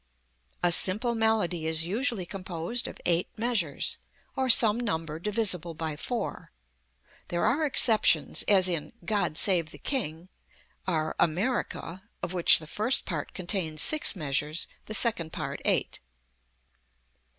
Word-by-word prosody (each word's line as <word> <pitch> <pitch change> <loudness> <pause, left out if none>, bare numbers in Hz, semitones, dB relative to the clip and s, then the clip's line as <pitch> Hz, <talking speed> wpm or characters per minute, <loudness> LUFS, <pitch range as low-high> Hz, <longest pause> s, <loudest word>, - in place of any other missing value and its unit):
A 175 - +2
simple 210 +8 +5
melody 215 -8 0
is 160 0 +2
usually 215 +2 -2
composed 185 +4 -5
of - - -10
eight 175 0 +1
measures, 220 - -1 0.4
or 260 -1 -1
some 225 -1 +8
number 165 -9 -4
divisible 185 -4 0
by 160 -1 -5
four. 235 +10 -6 0.8
There 175 0 -2
are 305 +3 +1
exceptions, 230 -5 +3
as 190 -3 +5
in 170 -4 -3
"God 205 -7 -1
Save 175 -5 +3
the - - -12
King," 175 - -4 0.6
our 155 -4 -2
"America," 185 +1 -2 0.2
of 180 - -4
which 175 -2 +6
the 160 - -9
first 215 - 0
part 155 -5 -6
contains 170 -4 -2
six 310 -7 0
measures, 150 0 -2 0.2
the 215 - -2
second 180 -10 +1
part - - -6
eight. - - 0
185 Hz, 130 wpm, -26 LUFS, 165-225 Hz, 0.8 s, some